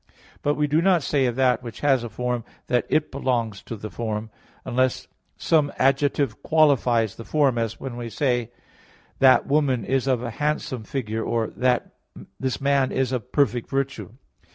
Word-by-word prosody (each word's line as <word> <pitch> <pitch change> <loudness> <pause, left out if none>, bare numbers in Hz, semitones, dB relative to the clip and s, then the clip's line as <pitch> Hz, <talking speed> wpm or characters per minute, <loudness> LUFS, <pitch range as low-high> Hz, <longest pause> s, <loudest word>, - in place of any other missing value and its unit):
But 145 0 +1
we 150 - +1
do 150 +3 +2
not 180 -3 +3
say 135 -3 +1
of 120 - -2
that 125 -2 +2
which 120 -2 -9
has 135 -4 +3
a 120 - -5
form, 125 0 -2 0.2
that 125 -1 0
it 155 - +1
belongs 120 -7 -1
to 115 - -7
the 110 0 -8
form, 110 -1 -4 0.3
unless 130 +1 0 0.3
some 150 -3 +2
adjective 135 -3 +1
qualifies 125 -9 +3
the 115 - -7
form; 135 -3 +2
as 115 -1 -3
when 130 -3 -6
we 120 -1 -5
say: 120 -2 0 0.7
"That 130 -1 +6
woman 140 -5 +1
is 135 0 0
of 125 -3 +1
a 120 - -4
handsome 145 -4 -2
figure," 110 -4 -3
or: 115 -1 -1 0.9
"This 130 -5 -2
man 140 -1 +2
is 130 -1 0
of 125 -5 -4
perfect 125 -5 +1
virtue." 135 -4 -3
130 Hz, 170 wpm, -24 LUFS, 115-140 Hz, 0.9 s, That